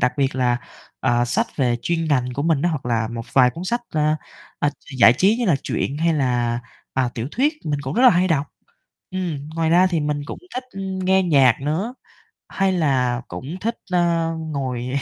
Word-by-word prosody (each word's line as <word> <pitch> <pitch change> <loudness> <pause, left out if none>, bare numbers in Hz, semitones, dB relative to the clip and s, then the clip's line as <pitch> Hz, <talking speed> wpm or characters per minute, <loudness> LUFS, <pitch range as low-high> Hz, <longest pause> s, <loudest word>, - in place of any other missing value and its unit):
đặc 125 +1 +2
biệt 135 -1 +1
là, 125 -2 +2 0.4
ờ, 120 0 +2
sách 225 - 0
về 125 -4 +2
chuyên 165 -1 0
ngành 125 -3 +1
của 140 - -2
mình 160 -3 +1
á, 175 - +3
hoặc 145 -6 -4
là 115 -2 0
một 115 -1 -5
vài 125 -2 +5
cuốn 170 +9 -7
sách, 240 +5 -1
ơ, 155 0 +1 0.4
ơ, 145 - +1 0.3
giải 115 -1 +8
trí 195 - +3
như 240 -3 -1
là 160 -6 +4
truyện 140 +2 -2
hay 165 +1 +2
là, 120 -4 0 0.3
ờ, 130 -2 +1
tiểu 120 +2 -3
thuyết, 285 +6 +2
mình 145 -2 -1
cũng 135 0 -4
rất 245 - +2
là 255 - +9
hay 180 0 +2
đọc. 150 -3 +1 0.6
Ừm, 170 -6 -4
ngoài 165 -1 +1
ra 180 +2 +5
thì 170 -3 0
mình 150 -1 -1
cũng - - -6 0.2
thích, 255 - -3
ừm, 190 -1 -5
nghe 190 +1 +3
nhạc 135 -8 +4
nữa, 170 - -2 0.5
hay 195 -1 +1
là 130 -7 +1
cũng 150 +7 -6
thích, 230 +2 -2 0.2
ơ, 170 -2 +2
ngồi 135 -4 -3
150 Hz, 210 wpm, -22 LUFS, 130-180 Hz, 0.6 s, là